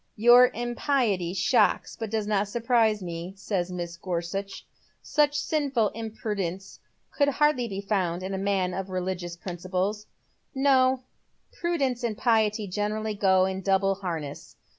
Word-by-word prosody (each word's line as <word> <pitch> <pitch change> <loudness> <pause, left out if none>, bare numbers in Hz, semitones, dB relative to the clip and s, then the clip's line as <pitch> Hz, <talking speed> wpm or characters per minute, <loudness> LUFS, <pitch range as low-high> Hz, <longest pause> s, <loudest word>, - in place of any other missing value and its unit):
" - - -46
Your 245 +1 +9
impiety 240 - 0
shocks 195 +7 +2
but 225 -2 -5
does 215 -1 -1
not 205 -1 +1
surprise 225 -2 +1
me," 170 +1 -6
says 185 -3 -2
Mrs. 170 -1 -6
Gorsuch. 185 +2 -4 0.2
" - - -40 0.2
Such 290 -1 +5
sinful 275 -9 +1
imprudence 210 -4 -5 0.3
could 285 - +2
hardly 285 -3 +2
be 195 -2 -4
found 185 -4 -1
in 190 +1 -4
a - - -1
man 195 -2 0
of 190 +1 -4
religious 180 -2 -3
principles." 185 +4 -3 0.3
*' - - -43 0.2
No, 260 -1 +3 0.5
prudence 275 -8 -1
and 225 -3 -2
piety 220 -3 +2
generally 210 +3 -2
go 190 -2 +3
in 190 0 -3
double 195 0 +2
harness. 165 -7 -6
200 Hz, 145 wpm, -26 LUFS, 185-235 Hz, 0.5 s, Your